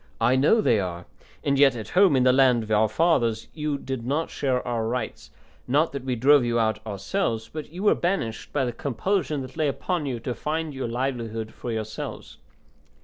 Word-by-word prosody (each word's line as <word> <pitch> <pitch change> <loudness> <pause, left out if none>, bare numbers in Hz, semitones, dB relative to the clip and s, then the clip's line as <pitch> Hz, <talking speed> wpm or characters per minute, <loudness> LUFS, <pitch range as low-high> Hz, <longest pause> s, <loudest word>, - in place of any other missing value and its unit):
I 120 +3 +3
know 150 +12 +4
they 115 - +3
are; 90 -2 -4 0.4
and 140 -1 +1
yet 140 -3 +6
at 110 -3 -6
home 185 -5 +5
in 130 - +3
the 125 0 +5
land 130 -3 +4
of 110 - -8
our 110 0 +3
fathers 115 -5 +1
you 150 -2 -2
did 135 -3 -5
not 145 +6 -1
share 130 -3 -1
our 115 -2 -1
rights; 120 -1 -4 0.4
not 150 +6 +2
that 140 -2 -5
we 130 -1 -1
drove 140 +3 +5
you 120 0 0
out 110 -1 0
ourselves, 110 - -2
but 155 -2 -6
you 180 +4 -6
were 210 - +5
banished 145 - -2
by 140 -3 0
the 120 - -3
compulsion 145 - -1
that 130 - -11
lay 155 -2 +2
upon 155 +2 -2
you 125 -3 -3
to 125 - -3
find 155 +3 -3
your 135 -2 -3
livelihood 115 -3 -3
for 120 - -6
yourselves. 110 -1 -6
130 Hz, 205 wpm, -25 LUFS, 115-150 Hz, 0.4 s, yet